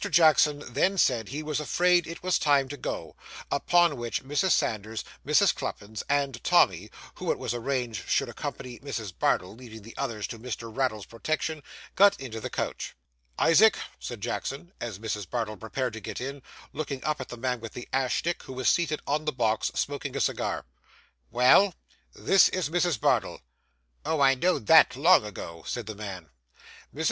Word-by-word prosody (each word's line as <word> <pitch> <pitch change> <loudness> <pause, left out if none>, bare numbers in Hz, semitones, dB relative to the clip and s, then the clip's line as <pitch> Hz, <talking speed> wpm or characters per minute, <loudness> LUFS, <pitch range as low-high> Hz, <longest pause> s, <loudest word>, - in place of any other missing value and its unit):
Jackson 155 -3 +4
then 165 +11 +1
said 120 - +2
he 150 +3 -4
was 150 -1 -2
afraid 175 +3 +2
it 165 +1 -8
was 185 -1 +2
time 140 -2 +3
to 145 - -5
go; 135 - -5 0.4
upon 170 +1 +3
which, 120 +1 -3
Mrs. 145 +7 0
Sanders, 110 - 0 0.2
Mrs. - - +4
Cluppins, 105 +2 -5
and 140 -3 0
Tommy - - +3 0.2
(who - - -2
it - - -1
was - - -3
arranged 120 -3 -3
should - - +2
accompany 125 -2 -6
Mrs. 115 -9 -5
Bardell, 90 +3 0
leaving 110 -3 -11
the 115 - -12
others 115 -7 -3
to 115 - -7
Mr. 115 -1 -6
Raddle's 125 -7 -1
protection), 155 +5 -3 0.3
got 200 0 +5
into 115 -5 -6
the - - -4
coach. - - -4 0.4
'Isaac,' 200 +5 +5 0.2
said 120 -4 -7
Jackson, 135 - -4
as 115 -5 -4
Mrs. 105 -3 -4
Bardell 115 -3 -2
prepared 120 +3 -3
to 110 - -6
get 100 - -6
in, 140 +2 -5 0.3
looking 140 -3 -4
up 150 -2 -1
at 130 - -7
the 120 - -7
man 125 0 -1
with 115 -1 -8
the 120 - -8
ash 130 -1 +1
stick, 175 +1 -2
who 130 - -9
was 130 -1 -2
seated 160 -3 +2
on 150 +2 -1
the 150 - +1
box, 115 -4 0
smoking - - -3
a - - -1
cigar. - - -1 0.6
'Well?' 130 +10 +5 0.4
'This 195 - +5
is 185 -5 -2
Mrs. 175 -6 +1
Bardell.' - - +1 0.6
'Oh, 160 - -1
I 135 -1 +6
know'd 170 -2 0
that 160 -2 +7
long 165 +5 +5
ago,' 85 -5 -8
said 120 -2 -3
the 110 - -5
man. 95 -6 -8 0.6
Mrs. 145 - -12
130 Hz, 180 wpm, -27 LUFS, 115-155 Hz, 0.6 s, that